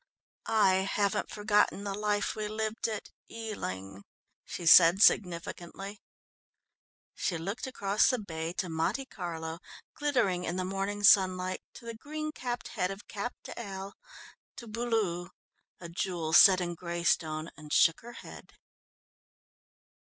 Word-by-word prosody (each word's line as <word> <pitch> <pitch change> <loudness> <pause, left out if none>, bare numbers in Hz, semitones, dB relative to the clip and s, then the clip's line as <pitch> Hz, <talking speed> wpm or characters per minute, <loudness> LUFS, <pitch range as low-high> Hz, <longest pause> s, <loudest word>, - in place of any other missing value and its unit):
"I 210 -4 +4
haven't 205 +1 0
forgotten 210 -1 +1
the 200 -1 -3
life 210 0 -1
we 215 -1 -3
lived 220 +1 -2
at 215 -2 -5 0.2
Ealing," 100 - -6 0.4
she 175 - -7
said 175 +3 +8
significantly. 180 +2 0 1.1
She 175 - -2
looked 195 +10 -4
across 205 -4 +2
the 255 - +1
bay 165 -6 -5
to 180 - -2
Monte 165 +11 -1
Carlo 165 -6 -6 0.3
glittering 245 - 0
in 175 - -3
the 185 0 -2
morning 195 +2 -3
sunlight, 185 -2 +4
to - - -12
the 230 - -5
green 305 +6 -5
capped 245 -4 -5
head 180 - -1
of 195 +1 -8
Cap 220 +4 -5
d'Ail, 195 -3 -7 0.6
to 240 - -9
Beaulieu, 215 -6 -1 0.5
a 170 - -8
jewel 170 -2 -3
set 190 +2 +8
in 175 -1 -2
greystone 170 -2 -1
and 150 -1 -12
shook 165 - +4
her 240 +1 -11
head. - - -12
195 Hz, 130 wpm, -30 LUFS, 170-215 Hz, 1.1 s, said